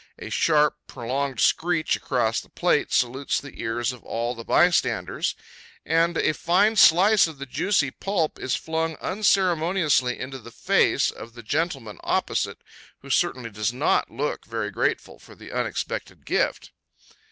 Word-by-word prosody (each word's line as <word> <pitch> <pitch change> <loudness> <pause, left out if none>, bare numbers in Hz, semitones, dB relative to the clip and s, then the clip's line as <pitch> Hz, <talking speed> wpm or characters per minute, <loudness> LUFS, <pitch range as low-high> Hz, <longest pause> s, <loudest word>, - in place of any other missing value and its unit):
A - - -8
sharp, 150 -2 +3
prolonged 130 +2 -3
screech 165 -1 +2
across 120 -3 0
his - - -19
plate 175 -4 +1
salutes 130 +3 0
the 145 - -10
ears 120 +1 -1
of 125 -2 -11
all 120 +1 -2
the 115 -2 -9
bystanders, 120 - +1 0.5
and 165 +2 +2
a 155 - +2
fine 190 +8 +2
slice 195 +1 +6
of 140 -3 -8
juicy 155 -1 +1
pulp 180 -3 -2
is 130 - -1
flung 160 0 -2
unceremoniously 175 - +1
into 130 +1 -6
the 115 - -12
face - - +2
of 115 - -11
the 120 - -10
gentleman 135 - -2
opposite, - - -1 0.4
who - - -7
certainly 125 -3 0
does 105 +2 -1
not 130 +5 +1
look 140 +6 -3
very 110 -2 -4
grateful - - -2
for - - -16
the - - -12
unexpected - - -4
gift. - - -1
140 Hz, 145 wpm, -24 LUFS, 120-170 Hz, 0.5 s, slice